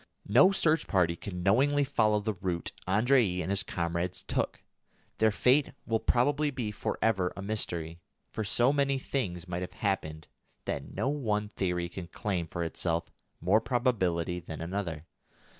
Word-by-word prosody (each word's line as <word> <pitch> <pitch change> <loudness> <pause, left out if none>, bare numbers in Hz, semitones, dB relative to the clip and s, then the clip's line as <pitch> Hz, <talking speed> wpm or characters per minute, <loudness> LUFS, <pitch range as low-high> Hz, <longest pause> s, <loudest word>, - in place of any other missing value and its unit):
No 120 - +7
search 160 -4 +2
party 90 -3 +2
can 90 0 -6
knowingly 140 +9 +4
follow 110 -6 +2
the 105 +1 -2
route 90 -3 -3 0.2
Andrée 105 -1 +3
and 90 - -3
his 100 -1 +5
comrades 85 +1 -2
took. - - -2 0.6
Their 110 - +5
fate 130 +7 +3
will 115 -1 +1
probably 145 +7 +2
be 125 -6 -3
for - - -3
ever 95 -5 +2
a 100 - -5
mystery, 85 -6 -3 0.3
for 110 - -3
so 120 +6 +3
many 140 -1 +2
things 95 -10 -3
might 90 0 -3
have 90 - -5
happened 80 -6 -2 0.4
that - - -4
no - - 0
one 105 -8 -1
theory 90 -4 -1
can 85 0 -7
claim 90 -1 -2
for 85 +1 -3
itself 85 0 -2 0.3
more 100 +6 +3
probability 100 -8 0
than 80 -2 -8
another. 85 -2 -4
100 Hz, 160 wpm, -30 LUFS, 90-120 Hz, 0.6 s, No